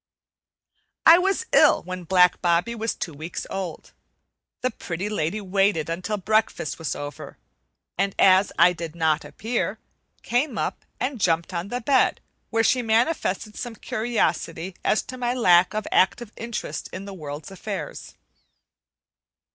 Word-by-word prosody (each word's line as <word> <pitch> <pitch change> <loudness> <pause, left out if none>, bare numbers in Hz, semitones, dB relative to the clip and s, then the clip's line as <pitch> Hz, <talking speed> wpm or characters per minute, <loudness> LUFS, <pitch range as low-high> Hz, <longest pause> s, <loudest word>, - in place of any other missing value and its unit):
I 330 +2 +9
was 390 +4 0
ill - - +5
when 185 -1 -6
black 180 0 +4
Bobbie 175 +6 +2
was 225 -1 -2
two 165 - -5
weeks 155 +4 -6
old. 190 -4 -5 0.7
The 255 - 0
Pretty 190 -1 -5
Lady 210 -1 -1
waited 195 -4 +1
until 180 +5 -2
breakfast 215 -5 0
was 160 - -3
over, 145 0 -8 0.6
and 195 0 +1
as 190 0 +5
I 175 +1 +6
did 165 -1 -7
not 160 -2 +1
appear, 220 +11 -3 0.5
came 245 0 0
up - - -3
and 255 -2 -2
jumped 170 +1 +1
on 170 +2 -3
the 245 +4 -3
bed, 265 +2 +3 0.3
where 225 0 +2
she 250 +2 +3
manifested 225 - 0
some 240 -2 -6
curiosity 200 -6 -2
as 215 - +2
to 255 - -9
my 245 0 0
lack 180 -5 +4
of 215 -1 -2
active 215 +4 +2
interest 230 -1 -5
in 195 - -7
the 200 - -8
world's 150 -2 -7
affairs. 210 - -6
195 Hz, 145 wpm, -24 LUFS, 170-230 Hz, 0.7 s, I